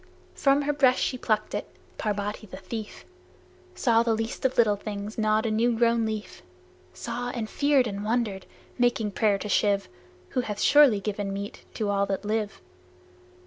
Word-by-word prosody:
From 280 0 +2
her 295 +1 0
breast 265 -3 +4
she - - 0
plucked 215 -3 -1
it, - - -3 0.3
Parbati 210 +1 -3
the - - -9
thief, 210 +3 -7 0.7
Saw 230 -3 +3
the 230 -1 +1
Least 225 +1 -4
of 260 - +1
Little 215 -3 +4
Things 205 +1 -6
gnawed 215 0 +1
a 225 - 0
new 230 +2 +2
grown 230 -1 +2
leaf! 215 -1 -5 0.5
Saw 245 0 -4
and 235 -3 -4
feared 285 +1 +2
and 200 -2 -4
wondered, 215 -4 -1 0.3
making 240 -3 +2
prayer 205 0 +2
to 210 - -6
Shiv, 200 -1 +2 0.4
Who 250 - 0
hath 210 -4 -5
surely 285 -9 +6
given 205 -1 -3
meat 200 +1 -6
to 215 -3 -1
all 200 0 +1
that 195 +1 -3
live. 215 0 -2
220 Hz, 170 wpm, -26 LUFS, 205-240 Hz, 0.7 s, surely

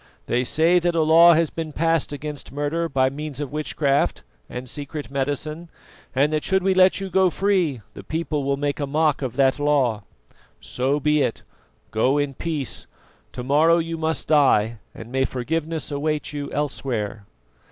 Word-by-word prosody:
They 125 +1 0
say 165 +7 +3
that 175 0 0
a 160 - +3
law 165 +2 +7
has 165 -1 +1
been 160 -2 -5
passed 165 -1 +1
against 145 0 -6
murder 145 +4 -2
by 130 -2 +2
means 145 0 -6
of 145 -3 -4
witchcraft 145 -2 0 0.3
and 125 +1 -6
secret 145 +2 -7
medicine, 145 +4 -3 0.5
and 145 +3 +2
that 155 - 0
should 190 -1 +1
we 190 0 +3
let 185 +1 +5
you 195 -1 -5
go 190 -1 +4
free, 180 - 0
the - - -10
people 155 -2 -2
will 140 0 0
make 145 +1 -2
a 145 - -2
mock 150 0 +1
of 130 -4 -3
that 135 0 +2
law. 135 -7 +1 0.6
So 135 +4 -1
be 150 0 +2
it. 115 - -1 0.5
Go 125 +6 +2
in 145 -1 -1
peace. 150 -2 -4 0.5
To 125 - -5
morrow 155 +6 +4
you 165 0 -2
must 160 0 -2
die, 115 -7 +3 0.2
and 115 - -10
may 135 0 +1
forgiveness 155 +5 -3
await 150 +1 -2
you 145 -1 -5
elsewhere." 115 -8 -3
145 Hz, 175 wpm, -23 LUFS, 135-160 Hz, 0.6 s, law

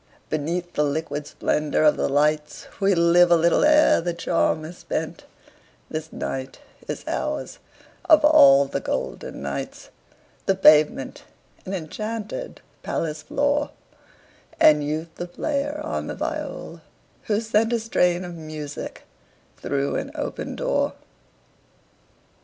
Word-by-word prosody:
Beneath 170 +4 -2
the 150 - +1
liquid 145 0 -2
splendor 150 0 0
of 150 - +5
the - - -1
lights 150 +2 0
We 195 -1 +3
live 170 +1 +5
a 170 - +6
little 170 0 +3
ere 305 - +5
the 175 0 -3
charm 165 -2 0
is 175 +3 -10
spent; - - -4 0.7
This 155 0 -5
night 130 0 -5 0.3
is - - -5
ours, - - -3 0.5
of 310 -4 +6
all 140 - +7
the - - -3
golden 65 +1 -4
nights, 70 0 -6 0.6
The 195 - +3
pavement 155 -7 +4 0.4
an 195 - -2
enchanted 215 - -5 0.2
palace 155 -1 -3
floor, 285 - 0 0.9
And 150 -1 +6
Youth 155 +3 -3
the 175 - -5
player 290 - -2
on 310 - -3
the - - -4
viol, - - -5 0.4
who 210 -1 +1
sent 225 0 +1
A 235 - +1
strain 180 -5 +1
of 175 - -7
music 155 -3 -7 0.5
through 140 0 -1
an - - -4
open - - -4
door. - - 0
170 Hz, 130 wpm, -23 LUFS, 150-210 Hz, 0.9 s, all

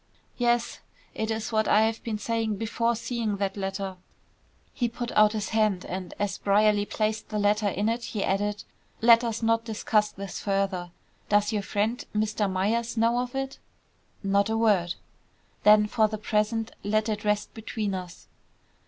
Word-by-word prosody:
"Yes. 240 -1 +1 0.3
It 220 0 -3
is 225 +1 -2
what 220 -1 +1
I 215 - +5
have 225 0 -1
been 220 -2 -2
saying 225 0 -1
before 230 +2 0
seeing 225 -3 -2
that 195 -1 -1
letter." 195 -1 -4 0.8
He 240 -3 0
put 240 +1 -5
out 215 0 +5
his 210 -2 -2
hand, 215 -4 +1
and 185 -1 -6
as 205 -3 -2
Brierly 205 0 +3
placed 215 +1 -2
the 215 - -2
letter 210 +1 +2
in 205 +2 0
it, 235 +1 -1
he 210 - -3
added, 205 +2 -1 0.4
"Let 230 +1 +6
us 230 -1 -2
not 230 0 +2
discuss 215 -1 0
this 195 -2 -7
further. 195 -3 -1 0.4
Does 210 +1 +3
your 210 - 0
friend, 210 +4 -1
Mr. 210 -1 0
Myers, 225 +6 0
know 230 +2 +3
of 250 +1 -4
it?" 270 0 -3 0.6
"Not 200 +1 +2
a 225 - 0
word." 200 -6 +2 0.7
"Then 210 0 +6
for 215 +1 +2
the 215 0 -4
present 215 +1 0
let 215 +2 +1
it 210 -1 -2
rest 210 0 0
between 220 -2 -3
us." 180 -2 -7
215 Hz, 170 wpm, -27 LUFS, 205-225 Hz, 0.8 s, Let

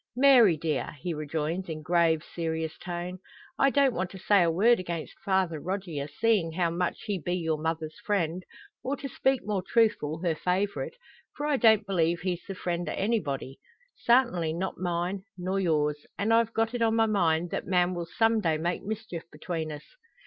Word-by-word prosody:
"Mary 245 - +6
dear!" 155 0 -2
he 175 - -2
rejoins 155 +4 -3
in 155 -1 -5
grave, 165 -1 +2
serious 160 -1 -2
tone, 175 +1 -5 0.4
"I 275 - +5
don't 275 -2 +3
want 185 -2 -2
to 190 - -10
say 200 +1 +4
a 170 - +3
word 215 +8 +4
against 170 -3 -5
Father 190 -5 +1
Rogier, 175 -5 -4
seein' 210 -2 +1
how 170 -1 +1
much 175 +1 -2
he 200 -3 -2
be 175 +3 -2
your 160 -3 -1
mother's 160 0 -3
friend; 180 -4 -1 0.4
or, 275 +2 -2
to 275 - -5
speak 265 0 +1
more 205 -2 -1
truthful, 185 -7 +1
her 170 -2 +2
favourite; 200 - -1 0.4
for 290 - -2
I 295 -2 +2
don't 220 -3 +5
believe 170 -3 +1
he's 180 -1 -2
the 195 - -5
friend 175 -2 -2
o' - - -2
anybody. 145 - -2 0.4
Sartinly, 235 -10 +2
not 185 +3 -3
mine, 175 +2 -1 0.2
nor 185 +2 -1
yours; 150 -4 +1
and 220 +3 +1
I've 230 0 +3
got 225 +1 0
it 245 - -3
on 225 -1 +3
my 225 0 +4
mind 175 -5 +1
that - - -3
man 180 0 +2
will 170 -1 -4
some 225 +4 +2
day 160 -5 +1
make 170 +3 -2
mischief 215 -5 -5
between 160 0 -4
us." 150 0 -7
180 Hz, 185 wpm, -28 LUFS, 165-215 Hz, 0.4 s, Mary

